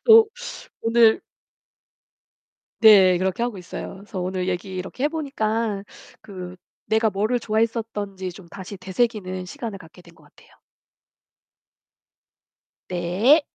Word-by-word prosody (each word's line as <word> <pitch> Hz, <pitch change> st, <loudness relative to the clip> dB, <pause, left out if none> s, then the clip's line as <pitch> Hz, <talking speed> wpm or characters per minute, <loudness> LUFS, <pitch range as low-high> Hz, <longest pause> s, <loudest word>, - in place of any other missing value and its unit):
또 445 Hz, -1 st, +8 dB, 0.5 s
오늘 230 Hz, -1 st, +5 dB, 1.6 s
네, 190 Hz, -5 st, +8 dB
그렇게 190 Hz, +5 st, 0 dB
하고 240 Hz, -4 st, -2 dB
있어요. 180 Hz, +1 st, -7 dB
그래서 200 Hz, 0 st, -7 dB
오늘 185 Hz, 0 st, -2 dB
얘기 185 Hz, +1 st, -4 dB
이렇게 185 Hz, +8 st, -5 dB
해 -, -, +5 dB
보니까 225 Hz, -9 st, -1 dB, 0.4 s
그 185 Hz, -3 st, -8 dB, 0.3 s
내가 220 Hz, 0 st, +2 dB
뭐를 215 Hz, +5 st, 0 dB
좋아했었던지 215 Hz, -4 st, -2 dB
좀 180 Hz, -1 st, -13 dB
다시 190 Hz, +1 st, -8 dB
되새기는 190 Hz, -2 st, -1 dB
시간을 230 Hz, -3 st, -6 dB
갖게 180 Hz, 0 st, -15 dB
된 170 Hz, -1 st, -18 dB
것 -, -, -21 dB
같아요. -, -, -22 dB, 2.4 s
네. 185 Hz, -, +3 dB
205 Hz, 245 characters per minute, -23 LUFS, 185-230 Hz, 2.4 s, 또